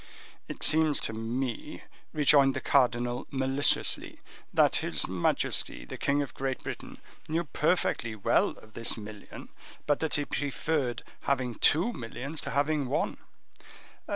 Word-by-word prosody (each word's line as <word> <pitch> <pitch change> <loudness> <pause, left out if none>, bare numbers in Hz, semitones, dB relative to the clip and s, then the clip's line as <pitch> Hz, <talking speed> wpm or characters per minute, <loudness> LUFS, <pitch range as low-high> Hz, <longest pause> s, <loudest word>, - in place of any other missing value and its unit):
"It - - -6
seems 155 -1 +4
to 110 - -3
me," 115 +2 -4 0.3
rejoined 140 -2 +5
the - - -1
cardinal, 120 -3 +1
maliciously, 135 +1 +2 0.3
"that - - +4
his - - -2
majesty 90 0 0
the - - -7
king 145 +1 +2
of 140 - -9
Great 135 -1 -3
Britain - - -7 0.3
knew 165 +2 +1
perfectly 145 -6 0
well 100 - +2
of 110 0 -17
this 115 0 -1
million, 105 -1 -10 0.4
but 145 -1 +2
that 160 - -1
he 145 - 0
preferred 140 -3 -2 0.3
having 130 -3 +1
two 170 - +3
millions 135 - -5
to - - -5
having 145 0 +1
one." - - -1
135 Hz, 135 wpm, -29 LUFS, 120-145 Hz, 0.4 s, rejoined